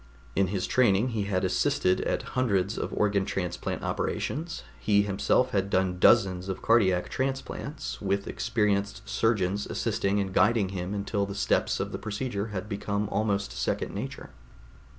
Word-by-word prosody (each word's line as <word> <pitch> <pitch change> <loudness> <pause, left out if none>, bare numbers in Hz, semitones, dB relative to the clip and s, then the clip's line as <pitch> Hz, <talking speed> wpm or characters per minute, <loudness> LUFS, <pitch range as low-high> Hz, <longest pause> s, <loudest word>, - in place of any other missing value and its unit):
In 100 - +3
his 95 0 -1
training 120 -1 +3
he 110 -4 -2
had 95 -2 0
assisted 90 0 +2
at - - -1
hundreds 105 -5 +1
of - - -3
organ 100 -2 +1
transplant 90 -3 -3
operations; 160 +4 -2 0.2
he 100 -1 +3
himself 105 +5 +1
had 100 -3 0
done 95 -2 +1
dozens 95 -3 +4
of 95 - -4
cardiac 95 -6 +3
transplants, 135 +2 -4
with 100 0 0
experienced 105 -3 -1
surgeons 105 -3 +1
assisting 100 +1 0
and 95 -2 -2
guiding 100 0 +3
him 95 +1 -4
until 100 0 -1
the 100 - -6
steps 100 - +1
of - - -2
the - - -4
procedure 110 -1 -3
had 105 -1 -5
become 100 0 -2
almost 100 -1 0
second - - -2
nature. - - -6
100 Hz, 150 wpm, -28 LUFS, 95-110 Hz, 0.2 s, dozens